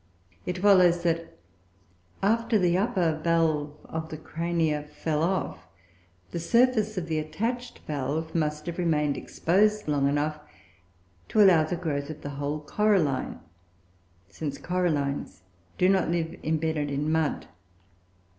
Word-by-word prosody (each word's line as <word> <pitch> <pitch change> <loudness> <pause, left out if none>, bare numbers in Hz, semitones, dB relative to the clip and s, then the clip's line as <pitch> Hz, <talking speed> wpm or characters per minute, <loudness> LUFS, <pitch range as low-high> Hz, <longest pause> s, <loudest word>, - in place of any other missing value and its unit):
It 180 0 -2
follows 180 -3 +5
that, 165 -1 -1 0.9
after 230 +2 +2
the 175 -3 +2
upper 180 -6 +1
valve 155 -3 +1
of 160 0 -5
the 155 - -6
Crania 165 -1 -1
fell 150 0 -2
off, 165 - -1 0.6
the - - -3
surface 220 +2 +2
of 180 - -1
the 160 -1 0
attached 225 +11 -3
valve 150 +3 -3
must 150 -2 -1
have 170 +1 -5
remained 150 -4 +1
exposed 210 +4 +1
long 140 -2 +2
enough 150 +2 -1 0.9
to 215 - +5
allow 180 -5 +7
of 155 - -2
the - - 0
growth 150 -4 -3
of 155 - -7
the 145 - -5
whole 145 +1 -2
coralline, 170 -5 +1 0.9
since 140 +8 -5
corallines 145 - -1 0.3
do 180 - +4
not 190 -2 +3
live 165 -1 -1
embedded 155 -1 0
in 145 +2 -1
mud. 160 -2 0
160 Hz, 135 wpm, -27 LUFS, 150-180 Hz, 0.9 s, allow